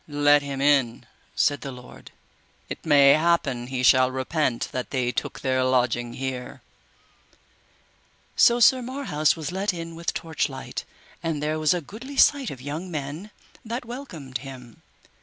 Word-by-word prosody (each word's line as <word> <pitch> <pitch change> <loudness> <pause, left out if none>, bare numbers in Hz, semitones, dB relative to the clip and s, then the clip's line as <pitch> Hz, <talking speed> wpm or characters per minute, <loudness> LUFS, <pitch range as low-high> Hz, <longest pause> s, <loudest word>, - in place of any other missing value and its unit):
Let 145 0 +4
him 140 -1 -5
in, 140 -5 +2 0.3
said 145 -2 +2
the 140 - -6
lord, 125 -1 -12 0.6
it - - -7
may 140 -2 +7
happen 150 -6 +1
he 130 -1 -3
shall 130 0 +5
repent 130 -1 -1
that 125 - -4
they 125 -2 -1
took - - -4
their 130 -1 +1
lodging 120 -2 +1
here. 130 -1 -5 1.7
So 240 0 +5
Sir 255 +2 +6
Marhaus 245 - 0
was 160 0 -5
let 190 +1 -1
in 165 0 -6
with 165 0 -3
torchlight, 150 -4 -4 0.4
and 165 -2 -2
there 155 +1 -1
was 155 +2 +3
a 175 - -2
goodly 245 - -10
sight 280 -3 +4
of 130 - -8
young 150 +7 -5
men 155 +5 -5 0.3
that 235 +3 -5
welcomed 170 - -7
him. 125 -3 -11
145 Hz, 150 wpm, -25 LUFS, 130-170 Hz, 1.7 s, may